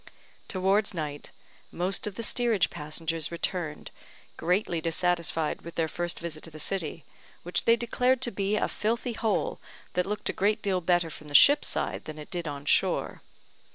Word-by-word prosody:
Towards 195 +1 +2
night, 150 -3 -4 0.4
most 180 +3 -1
of 205 - -5
the 230 - -4
steerage 230 -6 +3
passengers 160 +1 -2
returned, 170 -2 -3 0.4
greatly 175 0 0
dissatisfied 165 -1 0
with 170 - -9
their 165 -1 +1
first 175 +2 -2
visit 165 -2 -5
to - - -10
the 155 - -11
city, 165 -2 -2 0.4
which 175 - -2
they 230 - +6
declared 250 +2 +1
to 240 - -1
be 200 +1 0
a - - +1
filthy 235 +3 -1
hole, 220 -3 0 0.3
that 180 +1 0
looked 210 +1 -3
a - - 0
great 210 +2 +1
deal 190 -2 +1
better 175 -1 +2
from 155 0 -11
the 145 - -6
ship's 285 - +8
side - - -2
than 155 0 -7
it 150 - -10
did 175 -2 -3
on 145 -1 -5
shore. - - +1
175 Hz, 175 wpm, -28 LUFS, 160-210 Hz, 0.4 s, ship's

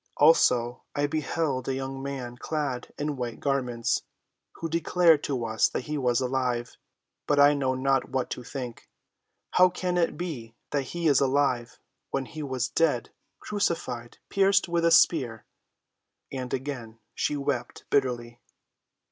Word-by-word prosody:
"Also 125 -6 +4
I 145 - +2
beheld 150 -3 -1
a 135 - 0
young 135 0 -4
man 135 -3 -5
clad 140 -2 -3
in 145 -1 -2
white 120 -2 -4
garments, 125 -4 0 0.5
who 165 - -4
declared 165 -1 +3
to 130 -5 -1
us 110 -1 +2
that - - -3
he 150 - -4
was 125 -4 +2
alive; 125 -2 -1 0.5
but 145 - +3
I 145 +1 +7
know 135 -2 0
not 135 0 +1
what 130 -1 -2
to - - -4
think. 125 -2 -7 0.6
How 185 0 +6
can 180 0 -2
it 170 - +1
be 125 -11 -5 0.2
that 140 -2 0
he 170 -1 +1
is 145 -3 +5
alive 130 -3 +1 0.3
when 135 -1 -1
he 155 +4 -8
was 130 -3 -1
dead—crucified—pierced 170 - 0
with 170 -1 +1
a - - +6
spear?" 130 -9 +4 0.9
And 130 -2 -4
again 125 -4 -4 0.2
she 150 - -1
wept 140 -3 -3
bitterly. 120 -3 0
135 Hz, 140 wpm, -27 LUFS, 125-150 Hz, 0.9 s, I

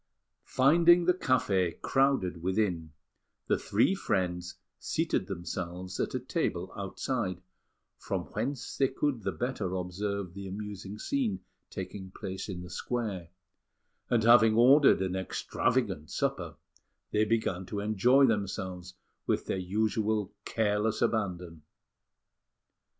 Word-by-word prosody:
Finding 170 +6 +5
the 180 - +5
café 100 - +1
crowded 135 -11 +1
within, 90 -4 0 0.5
the - - +1
three 110 - +2
friends 90 - -1 0.2
seated - - -1
themselves 90 +1 -5
at - - -1
a - - 0
table - - -2
outside, 100 -1 -3 0.6
from - - -3
whence 120 +4 -3
they 135 - +3
could 130 -2 -1
the - - -1
better 120 -7 -3
observe 95 +1 -3
the 100 0 -7
amusing 100 0 -6
scene 240 - -1 0.3
taking 95 0 -6
place 95 +2 -5
in 90 -2 -5
the 90 - -9
square; 100 -5 -3 0.8
and 120 -2 +2
having 115 -1 +6
ordered 130 -2 +6
an 95 -1 -2
extravagant 95 - -1
supper, - - -2 0.6
they 105 - +3
began 110 -4 0
to 105 - -4
enjoy 110 +7 +4
themselves 95 -5 -2 0.3
with - - 0
their 95 - -2
usual 105 +1 0
careless 110 0 0
abandon. 90 -7 -2
105 Hz, 115 wpm, -30 LUFS, 90-120 Hz, 0.8 s, having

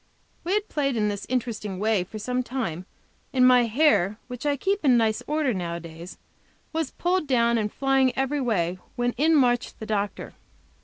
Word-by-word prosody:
We 360 +4 0
had 420 0 -1
played 275 -4 -1
in 210 -1 +1
this 205 -1 -5
interesting 225 -6 -2
way 210 -1 +1
for 200 +4 -9
some 250 +4 -1
time, 225 -10 -4 0.4
and 255 -1 +5
my 250 -1 +6
hair, 225 - +2
which 250 +3 -6
I 285 -1 +1
keep 395 +6 -1
in 255 -4 +5
nice 220 -2 +1
order 300 -4 +1
nowadays, 170 -1 -6 0.6
was 320 -3 -1
pulled 355 -2 -1
down 235 -3 +3
and 210 -1 -2
flying 270 -1 +2
every 270 +2 0
way; 185 -7 0 0.2
when 245 0 0
in 315 +6 +2
marched 245 -4 +1
the 220 - -6
doctor. 210 -2 -3
245 Hz, 175 wpm, -25 LUFS, 210-275 Hz, 0.6 s, my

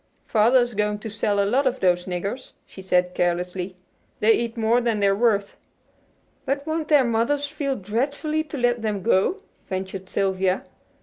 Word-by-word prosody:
"Father's 240 +2 +3
going 210 0 0
to 215 +1 -7
sell 210 -1 0
a 200 - +3
lot 260 +7 +2
of 260 +1 -1
those 180 -1 +2
niggers," 195 +8 -4
she 190 - -12
said 180 -1 +1
carelessly. 180 +1 -1 0.4
"They 220 - +4
eat 235 0 -2
more 230 +2 +2
than 230 -3 0
they're 200 -1 +3
worth." 205 -2 +1 0.9
"But 280 +1 -2
won't 315 -1 -2
their 290 -4 +5
mothers 240 +5 +1
feel 285 -2 -2
dreadfully 280 - -1
to 300 - -7
let 240 -2 +1
them 210 -4 -2
go?" 235 - +2 0.3
ventured 190 0 -5
Sylvia. 190 -1 0
220 Hz, 165 wpm, -23 LUFS, 190-260 Hz, 0.9 s, their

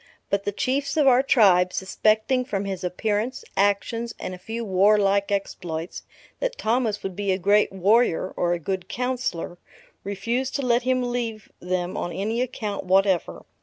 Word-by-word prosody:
But 200 0 0
the 205 - 0
Chiefs 275 +7 -1
of 300 - +4
our 255 -1 +6
tribe, 190 -9 +4
suspecting 215 +7 +1
from 200 -5 -3
his 190 -2 -4
appearance, 215 - -2
actions, 230 +4 0
and 185 - -5
a 180 - -9
few 225 +5 -5
warlike 200 +1 +3
exploits, 175 -4 -3 0.4
that - - -2
Thomas 225 -2 0
would 190 -2 -4
be 200 0 -1
a 185 - +1
great 200 +3 +3
warrior, 195 -1 +2
or 175 0 +1
a - - 0
good 185 +2 -4
counsellor, 245 -9 -3 0.4
refused 230 +7 -2
to 280 - -1
let 240 0 +3
him 255 0 +1
leave 235 -3 -4
them 180 0 -2
on 175 - -3
any 220 +6 -2
account 215 -5 -3
whatever. 190 -1 +1
205 Hz, 165 wpm, -24 LUFS, 190-240 Hz, 0.4 s, our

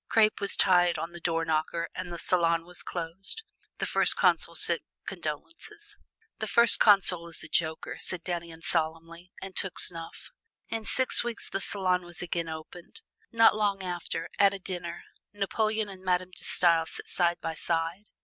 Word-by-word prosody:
Crape 215 -2 +3
was 200 - 0
tied 175 -2 +4
on 165 - -4
the 175 - -10
door 165 -1 -1
knocker 160 +1 -1
and 185 -1 -6
the 170 - -5
salon 170 -1 +2
was 180 0 0
closed. 180 - -5 0.3
The - - -2
First - - +4
Consul - - +2
sent - - +3 0.2
condolences. 420 +5 -6 0.4
"The 220 - -3
First 235 +3 +6
Consul 190 -5 +5
is 165 - -5
a - - -8
joker," 160 -1 -1
said 180 -2 0
Dannion 170 -2 -5
solemnly, 165 +2 -3
and 190 -1 -8
took 190 - -2
snuff. 165 -2 -2 0.4
In 225 -1 -4
six 260 -1 +3
weeks 235 -1 -4
the 195 - -2
salon 185 -3 0
was 175 -1 -10
again 170 -1 -3
opened. 165 - -9 0.3
Not 225 -2 +5
long 200 -2 0
after, 175 -2 -4
at 200 -1 +5
a - - -5
dinner, 175 -2 -5 0.3
Napoleon 215 +1 -1
and 190 -2 -9
Madame 185 0 0
De - - -12
Stael 165 -2 +3
sat - - -7
side 175 -1 +1
by 165 -1 -4
side. 165 +4 -2
180 Hz, 170 wpm, -28 LUFS, 165-200 Hz, 0.4 s, First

